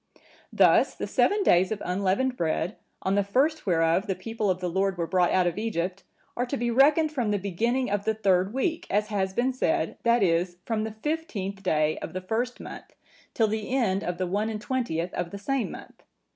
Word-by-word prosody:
Thus - - +4
the - - -4
seven 410 0 +2
days 185 - +4
of 215 - -2
unleavened 200 +8 0
bread, 165 -2 -1 0.3
on 190 - +1
the 200 0 +3
first 275 +8 +1
whereof 165 +3 +2
the 190 - -1
people 215 +2 -3
of 185 -1 0
the 180 - -2
Lord 190 +1 0
were 170 - -1
brought 180 0 +2
out 185 -1 +3
of 175 +3 -1
Egypt, 190 -4 -2 0.3
are 245 +1 -1
to 275 - -2
be 240 -1 -1
reckoned 295 +5 +4
from 245 -8 -1
the 205 - +1
beginning 225 +6 -1
of 205 0 0
the 220 - +1
third 190 -2 +2
week, 320 +7 -2
as 210 +2 0
has 195 -2 -1
been 255 +2 +1
said, 320 +6 -1
that 235 -2 +3
is, 175 0 +1
from 220 -2 -1
the 220 - -4
fifteenth 220 - -4
day 155 -5 +1
of - - -7
the 185 - -4
first 235 +6 -2
month, - - -10 0.4
till 225 - +3
the 215 0 -3
end 225 -7 +1
of 175 0 -3
the 185 - -1
one 205 +5 -1
and 215 -1 -4
twentieth 210 -8 -2
of 175 -1 -3
the 200 - -7
same 260 +4 -1
month. - - -11
205 Hz, 215 wpm, -26 LUFS, 185-240 Hz, 0.4 s, Thus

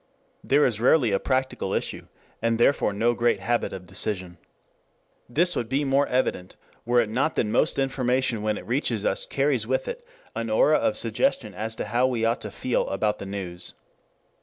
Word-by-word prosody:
There 145 +2 +4
is 110 -3 -1
rarely 125 -2 +4
a 100 - +2
practical 130 0 -1
issue, - - -3 0.3
and 115 0 +1
therefore 120 -1 +3
no 115 +4 +1
great 120 0 +1
habit 120 0 0
of 95 -1 -8
decision. 90 -2 -3 0.9
This 175 +8 +2
would 115 -2 -2
be 135 +3 +1
more 140 +1 +2
evident 125 -8 -1 0.3
were 120 0 +4
it 115 - -1
not 125 +9 0
that - - +1
most 110 +8 +1
information 130 -3 0
when 105 0 0
it - - -9
reaches 120 -4 -1
us - - 0
carries 135 -5 0
with 130 +1 0
it 485 0 -5 0.3
an - - -3
aura - - +4
of - - 0
suggestion 275 0 0
as 110 +1 -4
to - - -4
how 125 +3 +2
we 120 -3 0
ought 115 +1 0
to 105 - -5
feel 120 +4 -1
about 105 +2 0
the 100 - -6
news. 95 -3 -5
120 Hz, 185 wpm, -25 LUFS, 105-135 Hz, 0.9 s, There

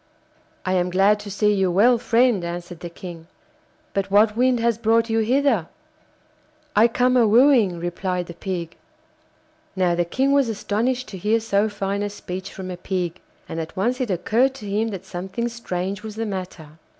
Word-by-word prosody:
'I 185 - 0
am 180 -1 +1
glad 195 +3 +3
to 205 0 -8
see 210 +1 +2
you 190 -2 +1
well, 230 +7 +4
friend,' 235 -4 +2
answered 175 0 -6
the 175 - -7
King, 170 -2 -10 0.7
'but 195 0 -1
what 210 +2 +4
wind 250 +1 +2
has 230 -1 +1
brought 230 0 +2
you 225 - +2
hither?' 235 - +2 1.1
'I 220 +3 +6
come 250 +2 +2
a 240 -3 +5
wooing,' 225 -6 +4
replied 180 +1 -2
the 170 - -9
Pig. 170 -2 -5 1.0
Now 180 -2 +2
the 175 0 +1
King 260 +11 0
was 280 -4 +3
astonished 235 +4 -1
to 190 - -8
hear 215 +5 +2
so 220 -1 +1
fine 200 0 -3
a 205 - -1
speech 190 -1 -7
from 185 -1 -7
a 180 - -6
Pig, 180 -1 -3 0.3
and 165 - -5
at 160 +2 -6
once 245 +7 0
it 250 - -1
occurred 235 +8 +1
to 215 -6 -9
him 210 +3 0
that 195 -4 -6
something 190 +5 -4
strange 195 -4 -4
was 215 -1 -8
the 225 +1 -2
matter. 180 -6 -7
205 Hz, 185 wpm, -22 LUFS, 180-230 Hz, 1.1 s, I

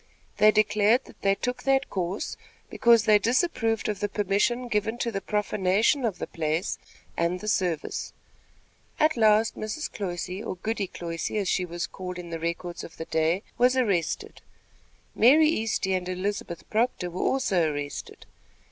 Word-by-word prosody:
They 210 +1 +6
declared 215 +3 +3
that - - -17
they 195 0 +3
took 250 +5 -3
that 270 0 +1
course, 185 +1 -3 0.4
because 235 -2 +4
they 210 -1 +6
disapproved 230 - +1
of 210 -2 -2
the 205 - -1
permission 205 +5 0
given 220 0 -1
to 235 -1 -1
the 195 -2 -3
profanation 210 +5 +1
of 205 -6 -1
the - - -4
place 160 +1 -2 0.4
and 170 +2 0
the 215 - -8
service. 180 -6 -1 0.9
At 310 0 +4
last 220 -1 +4
Mrs. 215 +9 -4
Cloyse, 185 0 -4
or - - -4
Goody 210 +1 -2
Cloyse, 170 -2 -4
as 205 -3 -1
she 180 +1 +1
was 175 0 -4
called 180 -1 -7
in 175 -1 -8
the 165 - -4
records 170 +1 -4
of - - -11
the 160 - -5
day, 160 +5 +1 0.2
was 250 +1 +4
arrested. 195 -10 -1 0.7
Mary 305 +7 +6
Easty 220 -7 0
and 180 0 -3
Elizabeth 185 -2 -4
Proctor 220 -5 0
were 180 - -4
also 185 - +1
arrested. 145 -1 -6
205 Hz, 160 wpm, -26 LUFS, 180-225 Hz, 0.9 s, They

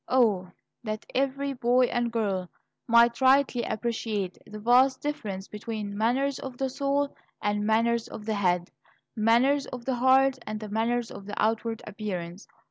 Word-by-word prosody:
O, 210 -8 +3 0.3
that 215 -1 -4
every 275 +1 0
boy 250 0 +3
and 240 -1 -1
girl 195 -6 -1 0.4
might 235 +1 +5
rightly 260 -1 +4
appreciate 220 -4 -2
the 215 - -8
vast 250 +5 +4
difference 205 -10 -4
between 210 -1 -5
manners 255 +6 +1
of 260 -2 -7
the 265 0 -1
soul 280 +1 -1 0.2
and 205 0 -1
manners 230 +1 +2
of 210 - -9
the 220 - -1
head, 180 -3 0 0.4
manners 240 +6 +3
of 245 -2 -8
the 260 -2 -1
heart 260 +1 +4
and 215 -1 -5
manners 230 +2 0
of 195 - -10
the 205 - -5
outward 225 +1 0
appearance! 195 -3 -6
230 Hz, 150 wpm, -27 LUFS, 210-260 Hz, 0.4 s, might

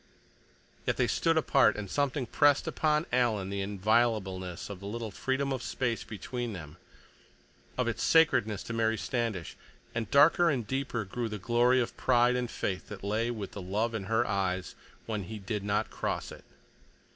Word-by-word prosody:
Yet - - +1
they - - +3
stood 165 -1 +1
apart, 135 -7 +4
and 105 -1 -4
something 140 +3 0
pressed 145 +4 +3
upon 150 0 +1
Alan 110 -6 +1
the 100 0 -2
inviolableness 100 -3 0
of 100 -3 -7
the 100 - -8
little 110 +1 -4
freedom 135 +6 -1
of 130 - -3
space 120 -1 -2
between 120 +2 -5
them, 80 -3 -9 1.0
of - - +1
its - - -2
sacredness 110 - +3
to 115 - -6
Mary 115 -1 +1
Standish, 115 -8 -2 0.4
and 115 -2 -3
darker 155 +6 +6
and 130 -7 0
deeper 130 -3 -2
grew 115 +4 -3
the 105 - -4
glory 120 +5 +3
of 120 - -2
pride 125 -1 +3
and 125 -1 -1
faith 95 -5 -3
that 105 -2 -9
lay 110 +4 0
with 110 -5 -5
the 100 - -7
love 105 +6 -1
in 105 -4 -3
her 115 +3 +2
eyes 95 -3 -1 0.3
when 105 -4 -3
he 110 +5 -6
did 105 0 -4
not 100 0 0
cross - - -3
it. - - -12
115 Hz, 175 wpm, -30 LUFS, 100-125 Hz, 1.0 s, darker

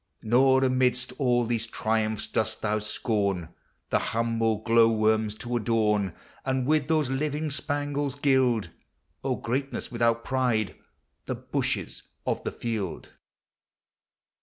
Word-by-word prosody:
Nor 130 +4 +4
amidst 130 -1 +1
all 120 -3 +3
these 115 0 -1
triumphs 110 -1 -1
dosl 110 0 -1
thou 105 0 +1
BCOni 100 -5 -1 0.4
The - - +3
humble 115 -1 0
glow 115 -1 +5
worms 110 -1 +2
to 120 +2 -4
adorn. 105 -5 +1 0.3
And 130 -1 0
with 150 0 +2
those 155 -4 +1
living 150 +2 -1
spangles 145 -1 -1
gild 130 -8 +2 0.5
(O - - 0
greatness 135 +4 -3
without 115 -1 +1
pride!) 125 -5 0 0.5
the - - -1
bushes - - -2 0.2
of - - -1
the - - -2
field. 110 -7 -4
115 Hz, 120 wpm, -27 LUFS, 110-130 Hz, 0.5 s, glow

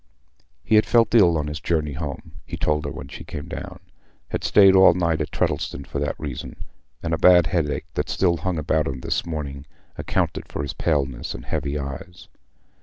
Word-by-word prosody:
He - - -2
had 110 0 +5
felt 115 -3 +3
ill 90 -8 +5
on 75 - -1
his 75 +1 -5
journey 75 -2 -1
home—he 70 -1 -7
told 75 0 0
her - - -3
when 70 - -8
she - - -9
came 70 - -7
down—had - - -9
stayed 95 -2 +6
all 95 -2 +7
night 85 -3 0
at 75 - -2
Tredddleston 70 - -2
for 70 - -4
that 75 0 -2
reason; 70 -5 -6 0.5
and 80 0 -1
a 80 - 0
bad 90 -2 +7
headache, 80 -4 -1
that - - -2
still 85 -3 +2
hung 90 0 -2
about 80 0 0
him 65 -2 -4
this - - -2
morning, 70 -4 -5 0.3
accounted - - -1
for - - -4
his 70 - -4
paleness 70 -6 -1
and - - -9
heavy 70 +1 -2
eyes. 70 +6 -7
75 Hz, 185 wpm, -23 LUFS, 70-85 Hz, 0.5 s, all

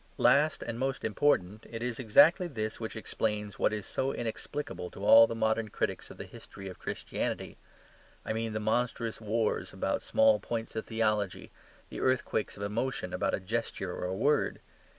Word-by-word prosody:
Last 145 +4 +4
and 120 0 -4
most 135 0 -1
important, 110 -3 +1
it 115 0 -5
is 125 -1 -3
exactly 160 - +5
this 110 -8 -4
which 110 -1 -5
explains 105 -2 -2
what - - +3
is 105 -2 -3
so 135 +1 -1
inexplicable 115 -5 -4
to 100 - -7
all 115 +2 +9
the 115 - -4
modern 110 0 +1
critics - - -2
of - - -11
the - - -6
history 95 - -11
of 95 - -9
Christianity. - - -3 0.7
I - - -1
mean 115 0 -2
the 110 - -1
monstrous 115 +1 -1
wars 110 -4 -1
about 95 +1 -1
small 275 0 +4
points 115 -1 -4
of 110 - -3
theology, 105 -4 -1 0.4
the - - -6
earthquakes 130 -5 0
of 100 - -5
emotion 105 -3 -2
about 90 - +1
a - - -5
gesture 95 -2 -3
or - - -4
a 90 +1 -2
word. 145 +7 +2
110 Hz, 175 wpm, -30 LUFS, 105-120 Hz, 0.7 s, all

